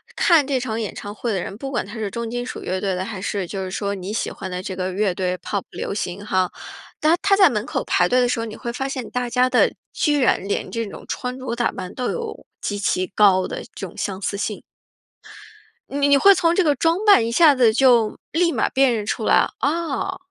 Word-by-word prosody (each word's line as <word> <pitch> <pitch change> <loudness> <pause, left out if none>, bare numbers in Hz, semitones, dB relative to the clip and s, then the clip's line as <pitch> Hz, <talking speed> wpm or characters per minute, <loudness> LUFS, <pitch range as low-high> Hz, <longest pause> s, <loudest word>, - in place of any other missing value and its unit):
看 330 -6 +4
这 265 -2 0
场 230 -3 -3
演 215 -3 -3
唱 205 0 -7
会 230 +1 -3
的 190 - -1
人， 200 - -6
不 270 +2 -6
管 240 - -1
他 205 +4 -10
是 215 -3 -3
重 235 +1 -4
金 245 +1 -3
属 - - -6
乐 185 +1 -2
队 195 0 -1
的， 185 +1 -2
还 200 -1 -6
是 195 -1 -3
就 190 +1 -4
是 185 - -5
说 200 0 -2
你 190 +2 -6
喜 - - -1
欢 190 -2 -7
的 180 0 -3
这 185 0 -5
个 185 0 -2
乐 200 +1 +1
队 180 -1 -1
pop 200 +1 -3
流 - - -5
行 200 -1 -4
哈。 185 -3 0 0.5
当 320 +3 +3
他 400 -1 +4
在 385 -5 +6
门 210 -1 -2
口 - - -2
排 180 - +2
队 250 +6 +3
的 245 - +2
时 245 - 0
候， 230 - -2
你 220 - -7
会 235 - -5
发 265 +3 -3
现 260 -4 -5
大 250 0 -2
家 250 +1 +2
的 - - +3 0.2
居 295 -2 +1
然 195 -5 +2
连 200 - -2
这 230 -1 -3
种 200 - -10
穿 250 +1 -4
着 255 -2 -4
打 240 0 0
扮， 185 -2 -7
都 250 - -2
有 465 -2 -6 0.2
极 205 - -2
其 185 -2 0
高 190 -3 +5
的 - - -6
这 195 - -6
种 - - -15
相 195 -1 -3
似 200 - -2
性。 210 +1 -3 1.3
你 280 0 +1
你 280 0 +6
会 395 +8 +7
从 340 -2 +2
这 375 - +3
个 295 -3 +2
装 330 +5 +2
扮 400 - +6
一 - - -2
下 305 +2 +6
子 240 -4 +4
就 240 -3 +4
立 340 +1 +2
马 - - 0
辨 265 -2 +3
认 210 - -3
出 220 - -2
来。 - - +4
啊。 325 +3 -1
230 Hz, 275 characters per minute, -22 LUFS, 200-270 Hz, 1.3 s, 会